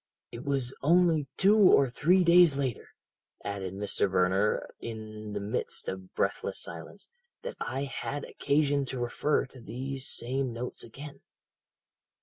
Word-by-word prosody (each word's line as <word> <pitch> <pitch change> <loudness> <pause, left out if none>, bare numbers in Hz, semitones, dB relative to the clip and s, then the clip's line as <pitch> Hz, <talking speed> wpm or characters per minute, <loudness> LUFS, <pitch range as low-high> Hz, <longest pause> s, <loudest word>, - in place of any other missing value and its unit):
"'It 120 - -8
was 135 -2 +1
only 165 -1 +3
two 200 +2 +5
or 185 -10 +6
three 175 +9 +3
days 170 -4 +6
later,' 130 -4 -3 0.6
added 95 -2 -4
Mr. 100 0 0
Verner 95 +3 +1
in 110 -2 -7
the 105 - -2
midst 100 +1 -3
of 95 0 -6
breathless - - -1
silence, - - -8 0.4
'that - - -4
I 135 +1 -3
had 140 +1 -4
occasion 145 -1 +1
to 130 -1 -4
refer 120 +5 0
to 135 -1 -15
these 130 +4 -5
same 130 +1 -2
notes 120 +2 -4
again. 140 +5 -10
130 Hz, 135 wpm, -29 LUFS, 110-145 Hz, 0.6 s, or